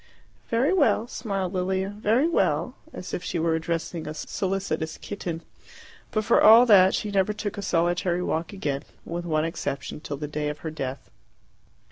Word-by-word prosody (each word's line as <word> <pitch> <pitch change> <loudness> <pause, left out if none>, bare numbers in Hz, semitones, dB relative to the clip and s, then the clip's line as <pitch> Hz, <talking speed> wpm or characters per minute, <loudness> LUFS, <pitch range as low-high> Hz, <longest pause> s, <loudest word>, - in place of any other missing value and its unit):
"Very 255 +9 +2
well," 235 - +3
smiled 195 -6 -3
Lilia, 190 +1 0
"very 215 +7 +2
well" 185 - +1 0.2
as 180 - -8
if 180 - -3
she 175 - -3
were 165 0 +1
addressing 165 0 -3
a 155 - -5
solicitous 185 -2 -2
kitten. 170 -5 -5 0.7
But 215 -1 -1
for - - +4
all 225 +3 +9
that 190 -4 +6
she 210 - -2
never 195 +1 +2
took 210 -1 -4
a 200 - -5
solitary 175 0 +1
walk 165 -1 -2
again, 145 -8 -2 0.2
with 175 +1 -4
one 155 -2 +1
exception, 145 -4 -4
till 145 -2 -5
the 150 +1 -4
day 150 0 -2
of 150 - -5
her 160 - -2
death. 135 -3 -6
180 Hz, 170 wpm, -26 LUFS, 160-205 Hz, 0.7 s, all